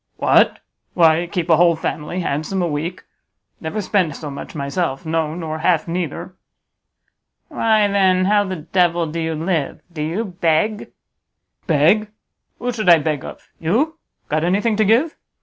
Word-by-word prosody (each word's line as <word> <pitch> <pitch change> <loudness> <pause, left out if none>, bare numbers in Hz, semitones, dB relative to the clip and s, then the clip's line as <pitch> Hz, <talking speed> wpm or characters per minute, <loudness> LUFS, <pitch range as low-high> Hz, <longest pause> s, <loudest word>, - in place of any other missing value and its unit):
"What? - - +3 0.4
Why, 165 0 +4
keep 175 -4 -2
a 160 - +6
whole 170 0 +4
family 160 +2 -4
handsome 155 +5 -2
a - - +1
week; 160 +3 -4 0.6
never 205 +7 -4
spend 180 -7 0
so 150 -2 -7
much 140 +4 -8
myself; 140 +1 -2
no, 160 -1 -1
nor 160 -2 -4
half 165 -1 +1
neither." 175 +1 -4 1.2
"Why 215 -2 +2
then, 190 -2 +3
how 205 +1 +3
the 190 -1 -4
devil 175 +1 +1
do 160 +1 -5
you 160 0 -2
live? 160 -2 -2
Do 155 - -5
you 170 +9 -2
beg?" 185 +3 0 0.8
"Beg? 170 +7 +3 0.5
Who 245 0 -2
should 215 -5 0
I 170 - +9
beg 150 -2 -2
of? - - -10
You? 275 - 0 0.3
Got 155 +1 0
anything 205 +6 +1
to 215 - +3
give? 245 +10 +2
175 Hz, 155 wpm, -20 LUFS, 160-195 Hz, 1.2 s, I